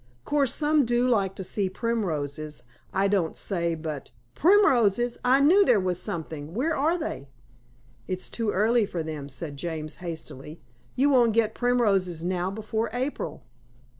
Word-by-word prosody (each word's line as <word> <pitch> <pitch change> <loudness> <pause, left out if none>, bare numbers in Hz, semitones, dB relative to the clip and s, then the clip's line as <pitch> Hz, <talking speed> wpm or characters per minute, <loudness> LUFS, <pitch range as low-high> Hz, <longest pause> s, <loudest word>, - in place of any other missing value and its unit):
"Course, 285 -4 +1
some 300 -1 +3
do 240 +1 +1
like 200 -6 +1
to 190 - -5
see 195 +1 -1
primroses, 155 - -3 0.3
I 195 +1 +2
don't 190 -5 0
say. 170 -4 -1
But 155 -3 -6
" 120 0 -40
"Primroses 245 - +3
I 260 +2 +4
knew 360 +8 +6
there 215 - +4
was 180 -1 -1
something. 160 -1 -5
Where 310 +7 0
are 315 +6 +1
they?" 140 - -5 0.8
"It's 185 -1 -3
too 225 -2 -2
early 215 +2 +2
for 170 -4 -3
them," 150 -3 -6
said 145 +2 -7
James 155 -1 -5
hastily. 160 -3 -7 0.4
"You 280 +3 +3
won't 240 -4 +4
get 220 -1 +2
primroses 195 -9 +1
now 180 0 -1
before 220 +2 -3
April." 260 +4 -3
200 Hz, 155 wpm, -26 LUFS, 165-245 Hz, 0.8 s, knew